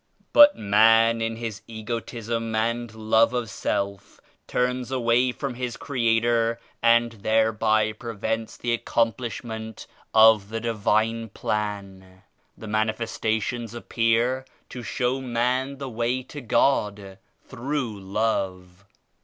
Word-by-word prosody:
But 295 0 +8
man 115 +2 +4
in 115 0 -1
his 110 -3 -6
egotism 115 0 -4
and 115 +1 -1
love 110 +2 +3
of 120 -4 -2
self 100 0 -3 0.3
turns 125 0 -1
away 125 -1 +2
from 135 +1 -4
his 125 -1 -4
Creator 115 -2 +1 0.2
and 115 0 +4
thereby 110 0 +1
prevents 110 0 -4
the 120 -1 -1
accomplish 115 0 -1
19 - - -10 0.2
ment 110 -1 -10 0.2
of 110 -2 +6
the 115 +1 -3
Divine 115 0 0
Plan. 100 -3 -5 0.3
The 110 - -9
Manifestations 110 +1 -2
appear 120 +2 +1 0.3
to 125 - -7
show 125 +2 -1
man 130 +2 -1
the 135 0 -6
way 120 +2 -1
to 145 +3 -9
God 105 -6 0 0.3
through 130 -3 -3
Love. 95 -2 -3
115 Hz, 115 wpm, -25 LUFS, 110-120 Hz, 0.3 s, But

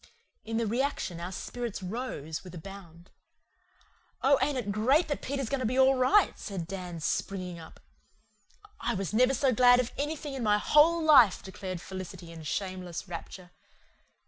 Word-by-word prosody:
In 225 0 -3
the 230 - 0
reaction 230 -6 -2
our 175 +2 -5
spirits 235 +1 -5
rose 180 - -5
with 180 -1 -10
a - - -6
bound. 175 -1 -12 1.1
"Oh, 275 +1 +5
ain't 285 -2 +1
it 215 -5 -2
great 260 - +3
that 290 - -2
Peter's 275 -2 -3
going 275 +3 -1
to 255 - -2
be 255 +3 -1
all 265 0 +6
right?" 265 +11 +3
said 190 -5 -5
Dan, 180 -2 -6
springing 180 +1 -3
up. 160 - -13 1.0
"I 235 +1 -1
never 215 +6 +2
was 270 -1 0
so 265 -1 +2
glad 245 +1 +6
of 250 -1 -1
anything 295 0 -3
in 265 - -4
my 210 -2 +3
whole 320 +8 +4
life," 260 -11 +6
declared 185 -2 -6
Felicity 185 -2 -8
in 165 -1 -10
shameless 185 +2 -4
rapture. 175 +1 -8
210 Hz, 170 wpm, -29 LUFS, 180-260 Hz, 1.1 s, all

